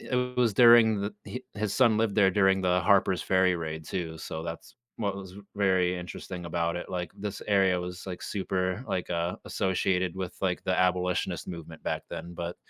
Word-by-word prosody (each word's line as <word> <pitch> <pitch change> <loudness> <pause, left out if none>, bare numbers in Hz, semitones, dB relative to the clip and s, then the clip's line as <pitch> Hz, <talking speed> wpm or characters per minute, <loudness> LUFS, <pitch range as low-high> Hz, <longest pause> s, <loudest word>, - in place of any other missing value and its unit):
it 125 0 -2
was 120 -4 +2
during 115 -2 +7
the 100 - -3
hi 125 - -5
his 105 -1 -2
son 120 -4 +4
lived 110 -3 +1
there 100 -3 +5
during 95 0 +3
the 90 -1 +2
Harper's 95 -1 +3
Ferry 95 -1 +3
raid 80 -1 -5
too, 80 -2 -4
so 80 0 -5
that's 85 0 -7 0.2
what 100 -3 -2
was 95 -1 -9 0.2
very 95 -3 +2
interesting 90 0 -7
about 85 0 -1
it, 90 - -6
like, 90 -3 -4
this 100 0 -5
area 95 -3 +3
was, 90 +1 -7
like, 90 -1 -6
super 95 0 -2
like, 90 - -2
uh, 85 +1 -1
associated 95 -1 0
with, 95 -2 -4
like, 90 -2 0
the 95 - +1
abolitionist 90 0 0
movement 85 -2 -8
back - - -2
then, 85 +2 -7
but, 85 +1 -5
95 Hz, 190 wpm, -28 LUFS, 90-100 Hz, 0.2 s, during